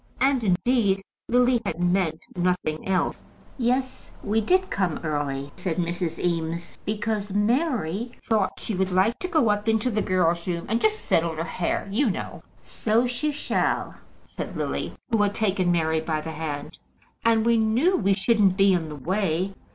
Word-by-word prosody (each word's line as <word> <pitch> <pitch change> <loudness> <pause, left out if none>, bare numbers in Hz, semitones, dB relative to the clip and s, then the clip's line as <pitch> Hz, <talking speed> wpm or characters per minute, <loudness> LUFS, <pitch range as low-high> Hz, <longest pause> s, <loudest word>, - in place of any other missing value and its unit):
And, 265 -2 +2
indeed, 195 +1 +2 0.3
Lily 245 0 +3
had 175 -5 -3
meant 175 -3 +1
nothing 180 -3 -1
else. 190 -1 +1 0.4
"Yes; 255 +2 -1
we 220 +2 +1
did 370 - +2
come 180 -5 0
early," 145 -2 -2
said 180 -3 -2
Mrs. 170 -1 -2
Eames, 170 -1 -2
"because 210 -1 -2
Mary 235 - 0
thought 215 -5 +1
she 220 - -3
would 190 0 0
like 195 +7 +2
to 365 - -3
go 305 -11 +3
up 205 +1 0
into 220 +3 +1
the 215 -1 0
girls' 175 -3 +1
room 170 -1 -2
and 225 +3 0
just 430 0 +1
settle 165 0 +1
her 160 - -2
hair, 175 +2 -2
you 240 +5 +2
know." 185 - -5 0.2
"So 225 +3 +1
she 250 +5 -1
shall," 295 - -1 0.3
said - - -7
Lily, - - -3 0.2
who 225 -2 +3
had 205 0 +1
taken 190 -4 +1
Mary 160 -2 +1
by 160 -1 -1
the 160 +1 -5
hand. 155 -1 -5 0.4
"And 225 -1 +3
we 235 0 +4
knew 235 +12 +3
we 200 - +2
shouldn't 195 -1 +3
be 195 -1 +5
in 170 -3 0
the 150 - -7
way. 185 +4 -1
195 Hz, 170 wpm, -25 LUFS, 170-230 Hz, 0.4 s, be